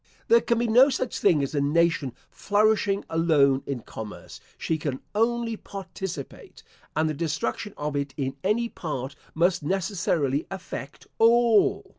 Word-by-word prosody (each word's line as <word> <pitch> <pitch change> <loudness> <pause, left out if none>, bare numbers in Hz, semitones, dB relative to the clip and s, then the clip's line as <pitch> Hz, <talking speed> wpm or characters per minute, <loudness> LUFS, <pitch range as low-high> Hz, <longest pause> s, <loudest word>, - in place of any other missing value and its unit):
There 465 0 +6
can 235 - +1
be 240 - +1
no 245 +5 +6
such 255 -3 -2
thing 170 -8 +3
as 140 - -3
a 145 - +1
nation 150 -3 +1 0.2
flourishing 205 -1 +1
alone 150 -5 +3
in 135 -4 -3
commerce: 110 -1 -9 0.2
she 160 -1 -2
can 140 -3 -3
only 230 +1 +1
participate; 190 -7 -8 0.3
and 155 +1 +2
the 155 - -1
destruction 160 - -3
of 150 0 -3
it 140 -1 -2
in 135 -2 -2
any 225 +4 +1
part 140 - -5 0.2
must 175 +2 +2
necessarily 165 -5 0
affect 175 -6 -7
all. 230 -1 +4
170 Hz, 145 wpm, -26 LUFS, 145-210 Hz, 0.3 s, There